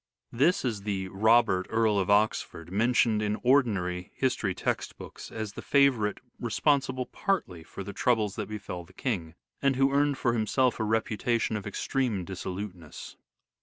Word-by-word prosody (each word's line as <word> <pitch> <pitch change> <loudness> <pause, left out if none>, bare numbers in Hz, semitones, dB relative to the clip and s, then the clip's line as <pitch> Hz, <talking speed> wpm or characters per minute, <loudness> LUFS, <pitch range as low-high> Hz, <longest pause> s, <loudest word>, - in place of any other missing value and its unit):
This 140 +7 +2
is 110 -5 -2
the 95 -2 -3
Robert, 110 -1 +3
Earl 110 -2 +2
of 95 - -1
Oxford, 100 -5 +1
mentioned 110 +1 +2
in 105 0 0
ordinary 100 -9 +2
history 115 -8 0
text - - -2
books - - -10
as 110 -2 -5
the - - -7
favourite 130 -7 +3 0.2
responsible 130 +1 +1
partly 150 - -2
for 85 +4 -8
the 100 - -7
troubles 110 -5 +1
that - - -4
befell 100 -4 -6
the 90 +2 -19
King, 90 -10 -3 0.3
and 140 -1 +2
who 135 +1 +3
earned 145 0 +2
for 120 -2 +1
himself 120 +3 +1
a - - +1
reputation 110 +1 0
of 105 -1 -4
extreme 110 -2 -1
dissoluteness. 95 -3 -7
110 Hz, 155 wpm, -28 LUFS, 95-125 Hz, 0.3 s, Robert